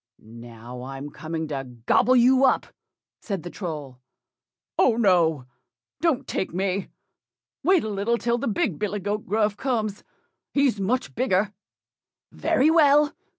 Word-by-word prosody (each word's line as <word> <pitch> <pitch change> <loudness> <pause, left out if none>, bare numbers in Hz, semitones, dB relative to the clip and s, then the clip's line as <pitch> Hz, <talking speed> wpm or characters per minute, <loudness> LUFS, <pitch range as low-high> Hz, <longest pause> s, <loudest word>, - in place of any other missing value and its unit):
"Now, 115 +2 -11
I'm 135 +3 -7
coming 160 +1 -5
to 135 -3 -3 0.2
gobble 255 - +4
you 255 +2 +5
up," 265 - +3 0.6
said 195 -6 -4
the 175 - -7
Troll. 150 -8 -6 0.8
"Oh, 240 - +4
no! 170 - +3 0.5
don't 295 -5 +1
take 180 - -3
me, 190 +1 -1 0.8
wait 375 -2 +4
a - - -3
little 210 +3 0
till 235 0 0
the - - -2
big 195 -7 -1
billy 210 0 -2
goat 205 +2 -3
Gruff 210 0 +1
comes, 220 -6 -2 0.5
he's 275 -7 +2
much 245 +7 -1
bigger." 210 -4 +1 0.8
"Very 290 +5 +2
well! 295 -2 +5
205 Hz, 135 wpm, -24 LUFS, 160-250 Hz, 0.8 s, you